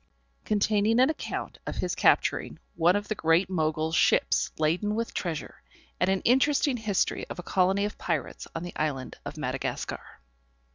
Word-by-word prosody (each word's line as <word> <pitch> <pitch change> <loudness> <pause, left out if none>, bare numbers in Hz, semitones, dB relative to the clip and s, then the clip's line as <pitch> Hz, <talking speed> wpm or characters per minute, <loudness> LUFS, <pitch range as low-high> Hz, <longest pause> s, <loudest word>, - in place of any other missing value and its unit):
_Containing 215 +2 +2
an 260 +4 +5
Account 315 - -5
of - - -3
his - - -2
capturing - - +2 0.2
one 175 +3 +3
of 205 0 -2
the 215 - 0
great 175 0 +2
Mogul's 155 -1 0
ship's - - +3
laden 175 +7 +1
with 230 +1 -3
treasure: 165 -4 -4 0.4
and 180 - +2
an 190 -1 +1
interesting 265 +1 +3
history 215 -4 -1
of - - -6
a 180 - -6
Colony 190 +3 +2
of 210 - -6
Pirates 165 -6 -3
on 165 - -3
the 175 - -7
Island 140 -4 -3
of - - -6
Madagascar. - - -3
190 Hz, 160 wpm, -27 LUFS, 165-215 Hz, 0.4 s, an